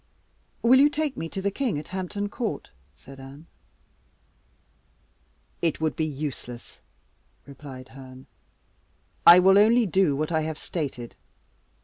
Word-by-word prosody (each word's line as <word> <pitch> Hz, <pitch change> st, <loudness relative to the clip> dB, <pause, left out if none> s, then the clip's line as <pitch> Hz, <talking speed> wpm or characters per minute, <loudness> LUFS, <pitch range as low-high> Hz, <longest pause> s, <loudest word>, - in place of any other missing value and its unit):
"Will 250 Hz, +3 st, +6 dB
you 290 Hz, +2 st, +6 dB
take 295 Hz, -2 st, -2 dB
me 165 Hz, -, -5 dB
to 190 Hz, -, -6 dB
the 200 Hz, -, 0 dB
king 240 Hz, -, -2 dB
at 150 Hz, -, -8 dB
Hampton 190 Hz, +2 st, -4 dB
Court?" 220 Hz, +2 st, -5 dB, 0.2 s
said 135 Hz, 0 st, -14 dB
Anne. 135 Hz, +4 st, -12 dB, 2.2 s
"It 165 Hz, -3 st, 0 dB
would 160 Hz, -1 st, -1 dB
be 160 Hz, -, -1 dB
useless," 135 Hz, -5 st, -7 dB, 0.6 s
replied 135 Hz, -2 st, -11 dB
Herne. 130 Hz, -1 st, -13 dB, 1.0 s
"I 170 Hz, -, +11 dB
will 190 Hz, +2 st, +6 dB
only 230 Hz, +3 st, +4 dB
do 185 Hz, -5 st, +2 dB
what 155 Hz, +3 st, -2 dB
I 160 Hz, -1 st, +1 dB
have 155 Hz, 0 st, -4 dB
stated. 135 Hz, -10 st, -5 dB
160 Hz, 130 wpm, -25 LUFS, 140-200 Hz, 2.2 s, I